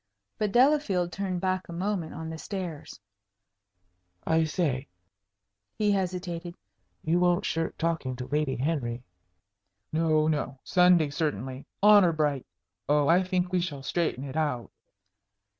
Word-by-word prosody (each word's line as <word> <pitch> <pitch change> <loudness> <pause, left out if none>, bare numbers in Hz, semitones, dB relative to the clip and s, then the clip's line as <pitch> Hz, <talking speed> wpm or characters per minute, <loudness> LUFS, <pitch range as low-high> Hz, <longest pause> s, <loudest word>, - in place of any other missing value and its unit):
But 210 -2 0
Delafield 240 -9 +3
turned 185 0 -3
back 185 -1 -1
a - - -6
moment 180 -2 -2
on 160 0 -6
the 160 - -7
stairs. 175 - -6 1.3
"I 160 0 +3
say" 150 -5 -1 0.9
he 210 -1 +2
hesitated 180 -3 -3 0.5
"you 165 +3 +2
won't 180 +2 +2
shirk 165 0 -2
talking 160 -6 -1
to 125 0 -6
Lady 145 0 -1
Henry?" 125 -4 -2 0.9
"No, 155 -1 +2
no. 150 -3 -1
Sunday, 180 -4 +4
certainly 130 - -3 0.2
honor 205 -5 +7
bright. 150 -4 -1 0.4
Oh, 145 -1 +3
I 175 +3 +5
think 185 -1 -1
we 180 - +3
shall 145 -6 -4
straighten 150 -2 -1
it 135 -1 -7
out." 145 -7 -1
165 Hz, 130 wpm, -28 LUFS, 145-180 Hz, 1.3 s, honor